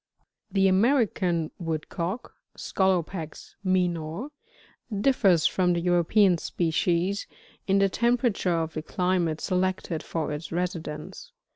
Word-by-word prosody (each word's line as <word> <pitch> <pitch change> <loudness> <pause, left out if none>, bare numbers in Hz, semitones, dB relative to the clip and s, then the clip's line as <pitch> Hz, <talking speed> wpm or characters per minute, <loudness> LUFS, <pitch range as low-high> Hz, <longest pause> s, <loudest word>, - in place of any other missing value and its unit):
53. 195 -1 -2
[The - - +6
American 190 - +2
Woodcock, 170 +5 -4
— - - -34
Scolopax 180 -4 -1
minor, 180 - -1 0.3
— 205 -5 -8
differs 195 - +4
from 180 -1 +2
the 170 - 0
European 175 +2 +3
species, 175 +4 0 0.4
in 195 0 +3
the 195 0 +4
temperature 235 -5 +1
of 160 - -6
the 155 - -3
climates 175 -2 -1
selected 185 -3 -1
for 160 -3 -3
its 150 +1 -6
residence. 170 - -4
180 Hz, 120 wpm, -26 LUFS, 165-195 Hz, 0.4 s, The